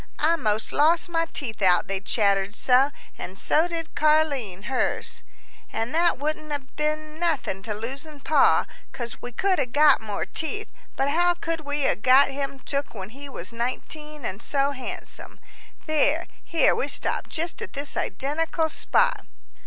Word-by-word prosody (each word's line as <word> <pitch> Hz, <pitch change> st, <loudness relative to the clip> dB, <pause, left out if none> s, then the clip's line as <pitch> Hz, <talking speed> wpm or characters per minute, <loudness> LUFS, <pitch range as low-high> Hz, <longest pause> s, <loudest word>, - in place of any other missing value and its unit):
"I 320 Hz, +2 st, +3 dB
most 220 Hz, -7 st, 0 dB
lost 325 Hz, +4 st, +3 dB
my 330 Hz, -1 st, 0 dB
teeth 230 Hz, -8 st, -5 dB
out, 180 Hz, -2 st, +4 dB
they 195 Hz, 0 st, -1 dB
chattered 200 Hz, 0 st, +1 dB
so; 260 Hz, +4 st, +4 dB, 0.3 s
and 185 Hz, -, -6 dB
so 320 Hz, -, +3 dB
did 330 Hz, -2 st, -5 dB
Car'line 285 Hz, -, +1 dB
hers. 260 Hz, +4 st, -1 dB, 0.5 s
But 225 Hz, +2 st, -2 dB
that 340 Hz, +2 st, +3 dB
wouldn't 305 Hz, +2 st, -3 dB
'a' 290 Hz, -, +1 dB, 0.2 s
been 305 Hz, +1 st, -2 dB
nothin' 310 Hz, -, 0 dB
to 210 Hz, +1 st, -4 dB
losin' 275 Hz, +7 st, -5 dB
Pa, 305 Hz, +2 st, +4 dB, 0.3 s
cause 235 Hz, -2 st, -5 dB
we 245 Hz, -, -6 dB
could 375 Hz, -, +1 dB
'a' -, -, +1 dB
got 290 Hz, +3 st, +5 dB
more 210 Hz, -2 st, -3 dB
teeth; 415 Hz, +7 st, -3 dB, 0.2 s
but 275 Hz, -, +1 dB
how 350 Hz, +4 st, +3 dB
could 330 Hz, -1 st, -3 dB
we 290 Hz, -1 st, -1 dB
'a' -, -, +3 dB
got 260 Hz, +6 st, +5 dB
him 275 Hz, 0 st, -4 dB
took 280 Hz, -1 st, -3 dB
when 190 Hz, -1 st, -6 dB
he 280 Hz, +3 st, -10 dB
was 205 Hz, -4 st, -6 dB
nineteen 295 Hz, +4 st, -4 dB
and 195 Hz, +2 st, -4 dB
so 280 Hz, +2 st, +1 dB
handsome? 260 Hz, -2 st, -7 dB, 0.5 s
There! 310 Hz, 0 st, +2 dB, 0.2 s
here 330 Hz, -, +3 dB
we -, -, -1 dB
stopped, -, -, -1 dB
just 330 Hz, +1 st, 0 dB
at -, -, -6 dB
this 285 Hz, 0 st, -3 dB
identical 320 Hz, -, -1 dB
spot!" -, -, +1 dB
285 Hz, 165 wpm, -25 LUFS, 235-315 Hz, 0.5 s, got